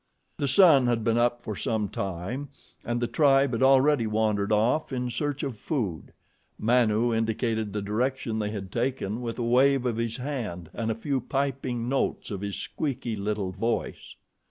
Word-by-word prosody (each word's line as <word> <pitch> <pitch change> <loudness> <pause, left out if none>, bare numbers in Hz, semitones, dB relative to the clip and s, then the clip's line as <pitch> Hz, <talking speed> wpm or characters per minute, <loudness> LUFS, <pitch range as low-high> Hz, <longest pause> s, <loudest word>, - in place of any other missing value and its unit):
The 140 - -1
sun 140 -4 +6
had 120 -2 +1
been 115 +1 +2
up 120 0 +1
for 110 - -4
some 110 +1 -1
time, 100 +10 -4 0.3
and 120 +1 -1
the 120 - 0
tribe 135 +2 +3
had 115 - -2
already 135 -2 +4
wandered 105 -1 0
off 120 +8 +2
in 125 -1 -2
search 145 +4 -2
of 130 -7 -4
food. 105 - -3 0.5
Manu 115 0 +2
indicated 110 -1 -1
the 105 0 -3
direction 115 +2 -1
they 105 -1 -1
had 100 -3 -6
taken 120 -2 -2
with 115 -2 -4
a 120 - -2
wave 130 +2 +3
of 120 -3 0
his 115 -1 -2
hand 120 - -5
and 115 -1 -2
a 110 - 0
few 135 +3 -2
piping 135 -3 -2
notes 135 -3 -1
of 100 -2 -4
his 100 -1 -3
squeaky 130 -6 -3
little 100 -2 -2
voice. 115 +3 -3
120 Hz, 175 wpm, -27 LUFS, 110-130 Hz, 0.5 s, sun